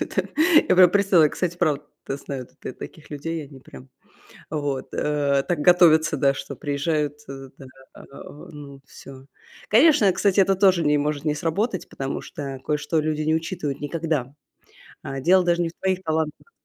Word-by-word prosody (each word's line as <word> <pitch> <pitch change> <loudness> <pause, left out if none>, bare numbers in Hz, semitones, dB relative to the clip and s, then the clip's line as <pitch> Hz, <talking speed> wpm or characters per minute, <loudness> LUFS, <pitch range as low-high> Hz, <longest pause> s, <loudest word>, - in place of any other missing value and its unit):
Да. - - +1 0.5
Я - - +5
прям 180 -1 +7
представила, 195 -4 +4
как, 150 - -1
кстати, 175 -1 -3
правда, 150 -4 0 0.2
да, 135 - -3
знаю 135 -2 -7
тут - - -30
я - - -5
таких 155 +4 -11
людей. 155 +2 -5
Они 135 -1 -14
прям 130 +1 -14 0.6
вот, 145 -3 -3
э, 145 -2 0
так 175 - 0
готовятся, 160 -2 +5
да, 140 0 +2
что 140 0 -7
приезжают, 145 +1 -2
э, 135 0 -9
да, 135 - -11
да. 135 +1 -18
А, - - -13 0.5
ну, 140 -2 -11
всё. 135 -1 -13 0.4
Конечно, 250 - +5
кстати, 195 +2 +2
это 195 0 +3
тоже 190 -3 +3
не 150 0 +3
может 145 0 -2
не 150 -1 0
сработать, 185 +6 -2
потому 135 0 -5
что 135 -2 -7
кое-что 150 +1 -1
люди 155 0 -2
не 155 +1 +1
учитывают 160 -3 -3
никогда. 145 -3 -3 0.7
А 135 0 -5
дело 180 +6 +4
даже 175 0 +1
не 170 - -1
в - - -10
твоих 190 -1 -1
талантах. 160 - -3
155 Hz, 180 wpm, -23 LUFS, 140-175 Hz, 0.7 s, прям